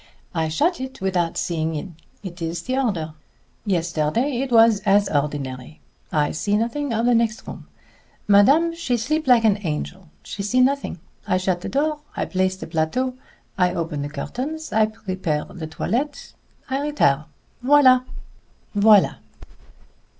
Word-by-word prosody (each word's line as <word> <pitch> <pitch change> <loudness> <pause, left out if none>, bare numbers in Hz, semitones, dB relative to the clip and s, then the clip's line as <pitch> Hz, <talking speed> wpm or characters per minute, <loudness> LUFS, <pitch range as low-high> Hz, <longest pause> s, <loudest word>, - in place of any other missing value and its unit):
I 160 -2 0
shut 280 - 0
it 265 0 -7
without 180 -3 -1
seeing 160 -1 -1
in. 160 +3 -6 0.3
It 180 -2 -8
is 165 +1 -3
the 255 - -2
order. 190 - -1 0.5
Yesterday 175 - 0
it 270 -2 -3
was 225 -2 +6
as 200 0 +3
ordinary. 140 -2 -3 0.3
I 150 -1 +1
see 205 +5 0
nothing 245 +5 -2
of 230 +1 0
the 245 - +4
next 230 -1 0
room. - - -9 0.6
Madame 275 +12 +5
sleep 295 0 -1
like 245 -3 +5
an 210 -2 +3
angel 175 +1 -5
she 205 - -6
see 210 +6 +1
nothing. 275 -5 +1 0.3
I 185 -3 +2
shut 185 -1 -1
the - - -5
door. 300 +2 0 0.2
I - - 0
place 185 0 0
the - - -7
plateau 165 +11 -1 0.5
I 180 -1 +2
open 165 -3 -3
the 145 - -4
curtains 270 - -5
I 220 0 +4
prepare 185 -8 -3
the 160 -3 -8
toilette 250 - -3 0.3
I 270 +1 -1
retire 155 - +1 0.4
voilà!" 260 -2 +6
205 Hz, 145 wpm, -22 LUFS, 165-255 Hz, 0.6 s, was